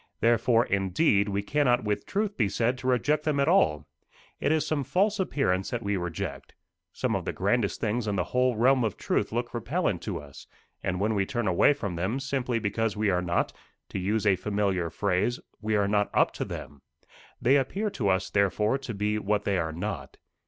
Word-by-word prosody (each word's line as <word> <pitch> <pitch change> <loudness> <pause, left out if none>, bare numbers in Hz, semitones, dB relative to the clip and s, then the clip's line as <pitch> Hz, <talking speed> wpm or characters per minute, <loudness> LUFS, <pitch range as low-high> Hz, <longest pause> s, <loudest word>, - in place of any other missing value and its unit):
Therefore, 115 +1 +3
indeed, 100 - +2
we 100 0 -1
cannot 125 -1 +2
with 105 -1 -2
truth 205 0 -1
be 105 -5 +1
said 120 +5 +1
to 130 - -5
reject 140 +5 +2
them 150 -2 0
at 140 - +2
all. 75 - +3 0.5
It - - +1
is 155 -1 +2
some 155 -2 -1
false 195 - +1
appearance 95 - 0
that 120 -1 -3
we 100 0 0
reject. 90 -3 -5 0.4
Some - - -1
of - - -2
the - - -2
grandest - - 0
things 110 +1 -1
in 100 - 0
the 90 - +1
whole 125 -1 +3
realm 125 +3 +4
of 110 -4 -2
truth - - -1
look 120 +1 -2
repellent 120 - -1
to - - -4
us, 70 -2 -12 0.3
and 90 -1 -2
we 105 0 +1
turn 120 -5 -2
away 95 +10 +4
from 100 -11 -4
them, 100 +10 -1
simply 130 -3 -1
because 110 0 -1
we 105 -1 +2
are 90 -1 +1
not 85 -1 0 0.4
to - - -4
use 105 +4 0
a 100 -2 +5
familiar 100 -3 -1
phrase 100 +7 0 0.2
we 110 0 0
are 100 -1 +2
not 105 0 +1
up - - +4
to - - -3
them. 70 0 -8 0.6
They 130 +3 +4
appear 195 +11 -1
to 105 - -1
us, 95 0 0
therefore, 105 +5 +2
to 125 -5 -6
be 105 +1 0
what 105 0 0
they 100 -2 +1
are 80 -1 -1
not. 85 -4 -5
105 Hz, 200 wpm, -27 LUFS, 100-130 Hz, 0.6 s, a